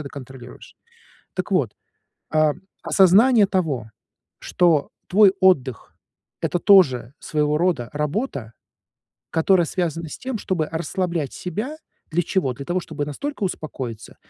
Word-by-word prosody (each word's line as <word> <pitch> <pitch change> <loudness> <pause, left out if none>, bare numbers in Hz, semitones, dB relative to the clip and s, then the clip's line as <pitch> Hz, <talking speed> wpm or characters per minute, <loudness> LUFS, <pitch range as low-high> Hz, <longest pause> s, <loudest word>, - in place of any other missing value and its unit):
это 145 - -6
контролируешь. 130 -3 -11 0.6
Так - - -3
вот, - - +2 0.6
а, 155 -1 +4 0.3
осознание 205 +4 +5
того, 145 - -1 0.5
что 165 -5 +2 0.2
твой 195 0 +6
отдых- 135 - +2 0.5
это - - 0
тоже 140 - +4
своего 150 -1 0
рода 165 -8 0
работа, 150 - -3 0.8
которая 170 +1 +3
связана 165 -2 -2
с - - -7
тем, 255 -4 -4
чтобы 165 -6 -2
расслаблять 170 -2 -2
себя. 215 - -5 0.3
Для 175 +2 +1
чего? 170 -7 0
Для 140 - -8
того, 175 +1 0
чтобы 155 -3 -5
настолько 280 - -5
успокоиться, 130 - -6
160 Hz, 120 wpm, -22 LUFS, 140-190 Hz, 0.8 s, твой